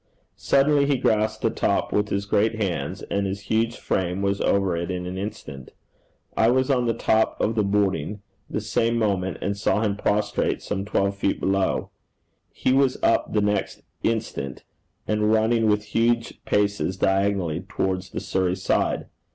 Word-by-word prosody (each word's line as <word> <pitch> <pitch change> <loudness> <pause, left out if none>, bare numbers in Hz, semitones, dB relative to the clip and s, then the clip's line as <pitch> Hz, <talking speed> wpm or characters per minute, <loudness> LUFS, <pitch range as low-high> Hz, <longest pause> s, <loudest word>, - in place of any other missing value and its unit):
Suddenly 140 +1 +3
he 140 -2 +2
grasped 110 -2 +1
the - - +2
top - - 0
with 105 0 +1
his 100 0 -1
great 110 +3 +2
hands, 100 -6 -3
and 100 0 0
his 100 +1 -4
huge 115 +3 0
frame 90 +1 -1
was 100 0 0
over 95 -3 +2
it 85 +1 -3
in 90 -1 -3
an 90 +1 -5
instant. 95 -10 -7 0.6
I 110 - +4
was 130 +2 +2
on 125 -2 +2
the 115 - +1
top 110 -1 +1
of 110 - +1
the 110 - +1
hoarding 100 -1 0 0.3
the - - -2
same 115 +1 0
moment, 95 -4 0
and 100 - -1
saw 105 +1 +1
him 105 -2 0
prostrate 105 0 0
some 100 -1 -3
twelve 100 -1 0
feet 100 - 0
below. 95 0 0 0.6
He 130 - 0
was 135 -1 +3
up - - +2
the 105 - +2
next 105 -1 -1 0.2
instant, 110 - -2 0.4
and 105 0 +1
running 110 +1 +3
with 105 0 +2
huge 115 0 +1
paces 100 -2 0
diagonally 95 -4 +1
towards 95 0 -3
the - - -5
Surrey 95 -1 0
side. 95 - 0
105 Hz, 165 wpm, -24 LUFS, 95-110 Hz, 0.6 s, I